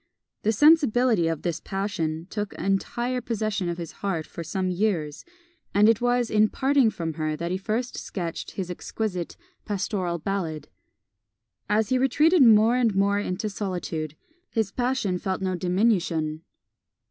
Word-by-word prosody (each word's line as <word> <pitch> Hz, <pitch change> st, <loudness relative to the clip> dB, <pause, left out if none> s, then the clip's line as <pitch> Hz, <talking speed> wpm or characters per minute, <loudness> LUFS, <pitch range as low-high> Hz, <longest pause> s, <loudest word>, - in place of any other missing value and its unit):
The 220 Hz, -, +2 dB
sensibility 250 Hz, -, +4 dB
of 165 Hz, -2 st, -2 dB
this 170 Hz, -3 st, -1 dB
passion 170 Hz, -5 st, -3 dB
took 210 Hz, -2 st, -3 dB
entire 240 Hz, +6 st, -1 dB
possession 215 Hz, -5 st, -2 dB
of 170 Hz, -, -3 dB
his 170 Hz, -2 st, -6 dB
heart 170 Hz, -6 st, -3 dB
for 170 Hz, -, -7 dB
some 185 Hz, +3 st, -2 dB
years, 175 Hz, -6 st, -1 dB, 0.5 s
and 205 Hz, +1 st, +6 dB
it 225 Hz, 0 st, +3 dB
was 245 Hz, -1 st, +1 dB
in 215 Hz, 0 st, +4 dB
parting 270 Hz, -3 st, +3 dB
from 165 Hz, -6 st, -4 dB
her 155 Hz, 0 st, 0 dB
that 170 Hz, +2 st, -4 dB
he 185 Hz, -, 0 dB
first 225 Hz, +5 st, -2 dB
sketched 170 Hz, -4 st, -5 dB
his 185 Hz, -2 st, -4 dB
exquisite 180 Hz, -1 st, -4 dB, 0.3 s
"Pastoral 195 Hz, -4 st, -2 dB
Ballad." 160 Hz, -4 st, -3 dB, 1.0 s
As 210 Hz, 0 st, +2 dB
he 255 Hz, -, +2 dB
retreated 300 Hz, +6 st, +4 dB
more 225 Hz, 0 st, +6 dB
and 230 Hz, -5 st, +2 dB
more 200 Hz, +1 st, +2 dB
into 205 Hz, +1 st, -2 dB
solitude, 180 Hz, -6 st, -4 dB, 0.3 s
his 220 Hz, -4 st, -1 dB
passion 245 Hz, -7 st, -1 dB
felt 190 Hz, 0 st, -2 dB
no 185 Hz, -1 st, 0 dB
diminution. 175 Hz, -4 st, 0 dB
200 Hz, 145 wpm, -25 LUFS, 175-225 Hz, 1.0 s, and